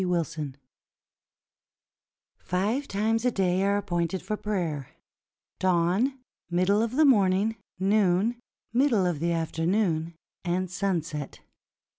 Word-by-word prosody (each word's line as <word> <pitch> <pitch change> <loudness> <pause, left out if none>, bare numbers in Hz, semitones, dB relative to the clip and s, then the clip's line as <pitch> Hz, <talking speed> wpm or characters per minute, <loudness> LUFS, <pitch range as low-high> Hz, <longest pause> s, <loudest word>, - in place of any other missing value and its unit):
WILSON 165 -6 -2 1.8
Five 215 +10 -1
times 220 +3 0
a 250 - +3
day 190 -4 +1
are 200 +1 +2
appointed 175 -2 -2
for 215 - -2
prayer 170 -11 -3 0.3
— - - -61
dawn, 185 +9 +2 0.3
middle 185 +4 +2
of 230 +2 -1
the 310 +2 +5
morning, 205 -3 +3 0.2
noon, 200 +3 +2 0.3
middle 240 -6 +3
of 175 -5 0
the 170 +2 0
afternoon, 165 0 0 0.3
and 180 +1 -1
sunset. 175 -6 -3
185 Hz, 110 wpm, -27 LUFS, 170-215 Hz, 1.8 s, the